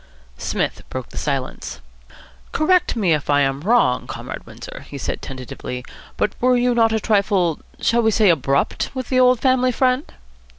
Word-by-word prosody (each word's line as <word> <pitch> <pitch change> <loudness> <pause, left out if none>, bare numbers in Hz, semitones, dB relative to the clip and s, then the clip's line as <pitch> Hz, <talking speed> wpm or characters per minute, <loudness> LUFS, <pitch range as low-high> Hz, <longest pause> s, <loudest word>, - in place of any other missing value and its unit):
Psmith - - -2
broke 130 -1 -5
the - - -12
silence. 135 -3 -3 0.7
"Correct 360 0 +2
me 195 -8 +2
if 150 -1 -2
I 145 0 +4
am 135 0 0
wrong, 200 - +2
Comrade - - -7
Windsor," - - -10
he - - -7
said - - -4
tentatively, 125 -1 -7 0.3
"but - - 0
were 250 0 +4
you 245 0 +2
not 225 -1 +3
a 220 - +1
trifle 200 -6 +1 0.2
shall 235 +1 +2
we 225 - +3
say 215 -2 +4
abrupt? 140 -3 0
with 255 -2 -4
the 255 - +3
old 250 -1 +5
family 255 -1 +3
friend?" 255 +3 +1
220 Hz, 170 wpm, -21 LUFS, -, 0.7 s, old